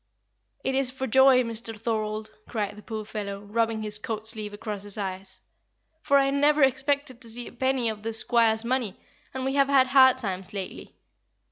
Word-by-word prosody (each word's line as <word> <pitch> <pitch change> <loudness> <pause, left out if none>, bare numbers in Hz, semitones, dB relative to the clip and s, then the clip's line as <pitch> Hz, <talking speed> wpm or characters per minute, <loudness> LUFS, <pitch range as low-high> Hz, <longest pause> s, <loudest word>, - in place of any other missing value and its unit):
"It 265 - 0
is 265 -1 +1
for 265 +1 -4
joy, 265 +1 +5
Mr. 225 -1 -4
Thorold," 215 -1 -2 0.2
cried 210 -3 -2
the 210 - -11
poor 215 -1 -6
fellow, 200 -2 -5
rubbing 225 +1 -1
his 210 0 0
coat 215 0 -4
sleeve 215 -2 -3
across 205 -1 -6
his 205 0 -3
eyes, 190 -1 -5 0.6
"for 280 -3 +3
I 275 0 +3
never 290 +1 +3
expected 270 0 0
to 230 - -7
see 240 +2 -3
a - - -9
penny 260 -1 0
of 215 -1 -3
the 225 +1 -3
squire's 225 0 +2
money, 240 -5 -1 0.3
and 260 0 -4
we 270 - 0
have 275 -1 +3
had 270 -2 +5
hard 260 -1 +6
times 190 -1 -5
lately. 195 -2 -7
230 Hz, 190 wpm, -26 LUFS, 210-265 Hz, 0.6 s, hard